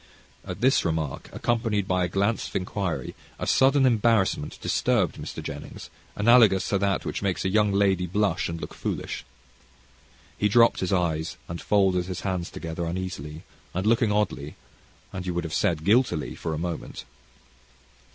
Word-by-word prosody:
At - - -7
this 130 +2 +4
remark, 80 -4 -2
accompanied 110 -4 0
by 90 -1 +1
a - - +1
glance 100 +5 0
of - - -13
inquiry, 95 -1 -2 0.2
a - - -4
sudden 135 +1 +4
embarrassment 115 - +2
disturbed - - +1
Mr. - - -7
Jennings, - - -8 0.2
analogous 110 -3 +5
to 100 - +1
that 100 -1 0
which - - -3
makes 95 -2 -1
a - - +2
young 105 +1 +3
lady 95 -2 +2
blush 100 -1 0
and 85 0 -4
look - - -7
foolish. - - -4 1.2
He 105 - +2
dropped 115 +2 +5
his 95 - -1
eyes, 80 -4 0
and 85 0 -6
folded 95 -3 +2
his 95 -2 -5
hands 90 -3 -2
together 85 0 -5
uneasily, 85 -4 -5 0.3
and 95 +2 -1
looked 115 +2 +3
oddly, 105 -9 0 0.6
and 90 -1 -5
you 90 - -2
would 85 - -1
have 80 -2 -5
said, 80 -1 +1
guiltily, 110 -6 +2
for 80 -1 -4
a - - -4
moment. 85 0 -5
95 Hz, 160 wpm, -26 LUFS, 85-105 Hz, 1.2 s, analogous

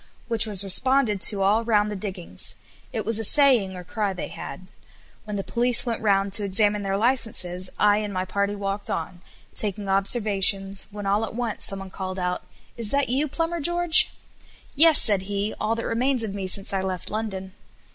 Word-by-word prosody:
which 230 -1 +2
was 200 -2 +2
responded 225 +1 +2
to 200 -2 +6
all 210 +4 +2
round 210 -2 +1
the - - -4
diggings. 185 - -5 0.4
It - - -4
was 225 0 +1
a - - -2
saying 240 -7 +4
or 180 - -8
cry 205 +2 -3
they 180 - -6
had. 185 - -9 0.6
When 210 -1 -5
the 195 - -3
police 240 +3 +1
went 235 -2 -3
round 195 -2 +1
to 210 0 +4
examine 205 +1 +1
their 195 0 -2
licences, 200 -6 0
I 205 0 +4
and 210 -1 -4
my 185 -1 -3
party 200 +2 -2
walked 200 0 -4
on, 170 +2 -4 0.3
taking 205 -1 +1
observations, 195 -1 +2
when 205 -1 -8
all 200 +2 +1
at 220 - -6
once 240 -2 -3
some 195 - -1
one 195 -1 -9
called 185 0 -6
out, 180 -1 -2 0.4
"Is 230 -3 0
that 280 0 0
you, 275 +5 +1
Plumber 330 +4 -2
George?" 345 +1 +3 0.6
"Yes," 320 +1 +6
said 205 -3 +1
he, 205 +1 -2
"all 220 +2 0
that 230 - -5
remains 250 +1 +1
of 210 -3 -4
me 195 -2 -4
since 195 +1 -3
I 195 - 0
left 185 -2 -5
London." 195 -3 -5
205 Hz, 195 wpm, -24 LUFS, 195-230 Hz, 0.6 s, to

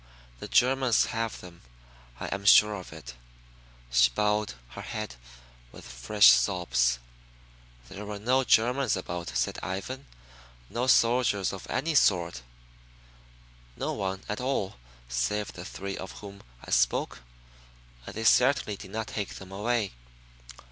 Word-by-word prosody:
The - - -7
Germans 130 -2 +3
have 115 -1 -3
them, 85 -1 -13 0.6
I - - -4
am 100 - -5
sure 105 +2 +7
of 95 -3 -8
it." 75 -5 -10 0.8
She - - +5
bowed 105 +5 0
her - - -9
head 110 -2 -5 0.6
with - - -13
fresh 60 - +5
sobs. 65 -10 +2 0.9
"There 100 +9 -8
were 105 -1 -5
no 125 +6 +2
Germans 125 +1 +3
about," 85 -3 -5
said 60 - -1
Ivan. 100 - -5 0.6
"No 125 +2 -1
soldiers 115 -6 +3
of 95 - -8
any 160 +4 -1
sort; 85 - +2 1.4
no - - -2
one 95 0 -3
at 105 +4 -3
all 125 - -2 0.3
save 60 +13 -2
the 90 - -8
three 100 0 -6
of 95 - -7
whom 100 -1 -11 0.2
I - - -9
spoke - - +1 0.9
and - - -8
they 110 - -4
certainly 125 -3 +3
did 95 - -11
not 110 +2 -3
take 105 -2 -5
them 95 0 -11
away." 105 +1 -1
100 Hz, 135 wpm, -28 LUFS, 90-115 Hz, 1.4 s, sure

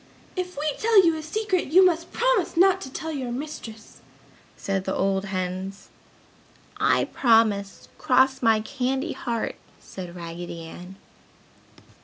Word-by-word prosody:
"If 365 -2 -4
we 300 +2 -2
tell 435 -4 +5
you 330 -1 +3
a 315 - -5
secret 375 +3 -1
you 365 +6 +6
must 340 -1 +1
promise 485 -9 +1
not 380 +1 +5
to 265 - -7
tell 320 +4 -5
your 260 -5 -4
mistress!" 240 -5 -8 0.6
said 195 -1 -2
the 190 - -1
old 195 0 0
hens. 190 +1 -4 0.9
"I - - +3
promise! 220 -5 +2
Cross 260 +1 +3
my 225 -2 +4
candy 265 +6 -2
heart!" 235 -2 -3 0.2
said 180 -2 -9
Raggedy 170 0 -7
Ann. 180 +3 -10
250 Hz, 135 wpm, -25 LUFS, -, 0.9 s, you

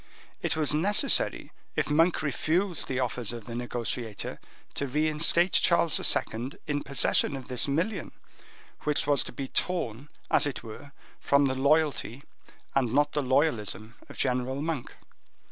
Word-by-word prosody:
It - - -1
was 150 -2 +1
necessary, 205 - +2 0.2
if - - 0
Monk 160 +3 +2
refused 165 +4 0
the 130 -1 -2
offers 125 -2 -1
of 120 -3 -8
the 115 - -7
negotiator, 120 -2 -4 0.3
to 140 - -3
reinstate 155 +5 +3
King - - +4
Charles 170 -2 +4 0.2
II. 120 +5 -3
in 145 -2 -1
possession 140 +1 +2
of 135 - -9
this 125 +1 +1
million, 170 +10 -1 0.7
which 150 -1 0
was 145 -1 +2
to - - -5
be 135 - -5
torn, 145 -6 -2 0.2
as - - +4
it 140 - -5
were, 120 +6 -10 0.3
from 140 0 +3
the 130 - +1
loyalty 140 -2 +1 0.5
and 130 -4 +1
not 145 +3 +2
the 150 - 0
loyalism 125 -5 0 0.2
of - - -11
General 125 +2 0
Monk. 155 -4 -4
140 Hz, 150 wpm, -28 LUFS, 125-155 Hz, 0.7 s, King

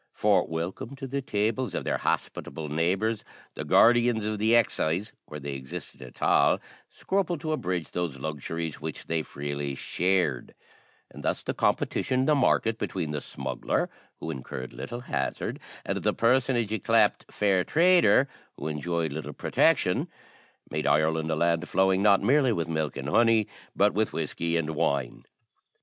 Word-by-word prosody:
For, - - +3
welcome 85 +10 -4
to 135 0 -7
the 140 +1 -3
tables 110 +1 -1
of - - -2
their - - -1
hospitable 75 +2 -3
neighbours, 95 +8 0 0.3
the - - -5
guardians 120 -2 +4
of 105 -1 -2
the 110 +2 +4
excise, 105 -3 +1 0.2
where 75 - -7
they 70 0 -5
existed 65 -1 -8
at 65 -2 -9
all, - - +4 0.3
scrupled 185 -4 -1
to 155 - -2
abridge 90 - -2
those 85 -6 -3
luxuries 80 +2 -4
which 80 -1 -6
they 80 -1 0
freely 70 -1 -4
shared; 90 -6 0 0.6
and - - -10
thus - - -1
the - - -2
competition 130 0 +1
in - - +1
the 150 - +4
market 115 -5 +2
between 85 -6 -3
the 75 -1 -3
smuggler, 65 -1 -2 0.3
who - - -4
incurred 65 -1 -7
little 120 - -6
hazard, - - -3 0.3
and - - -2
the - - +1
personage 120 -2 +2
ycleped 110 -3 +2
fair 95 -3 +2
trader, 165 - +4 0.3
who - - -4
enjoyed 80 0 -2
little 80 +1 -5
protection, - - +2 0.6
made 75 0 -1
Ireland 80 +2 +2
a 80 - +1
land 85 +1 +1
flowing, 95 0 +3
not 100 -1 +5
merely 135 -1 +4
with 85 -7 -1
milk 80 -2 -2
and 70 0 -5
honey, 115 +5 +4 0.3
but - - +3
with - - 0
whiskey 85 0 -1
and 80 -1 -1
wine. 70 -4 -1
90 Hz, 160 wpm, -27 LUFS, 75-115 Hz, 0.6 s, not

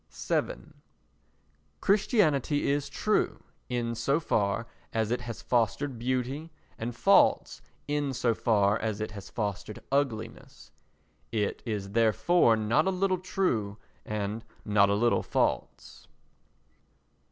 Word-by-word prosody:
vii - - -1 1.2
Christianity 160 - +2
is 145 0 -1
true 215 +8 0 0.3
in 120 -2 -1
so 125 +6 +1
far 110 -7 0 0.3
as 110 -1 -1
it 125 - 0
has 115 -2 -7
fostered 120 +2 0
beauty 130 +5 -2 0.3
and 115 +1 -4
false - - +3 0.3
in 145 -1 0
so 120 -2 +1
far 105 -2 +2
as 110 -2 -2
it 110 - -3
has 100 -2 -9
fostered 105 -1 -4
ugliness. 115 -5 -3 0.6
It 105 -3 -1
is 100 -3 -3
therefore 115 - +4
not 110 - +1
a - - +4
little 185 0 +1
true 120 - -1 0.3
and 105 +1 -3 0.2
not 100 -1 +4
a 100 - +2
little 120 +3 +2
false. - - -2
115 Hz, 120 wpm, -28 LUFS, 105-145 Hz, 1.2 s, therefore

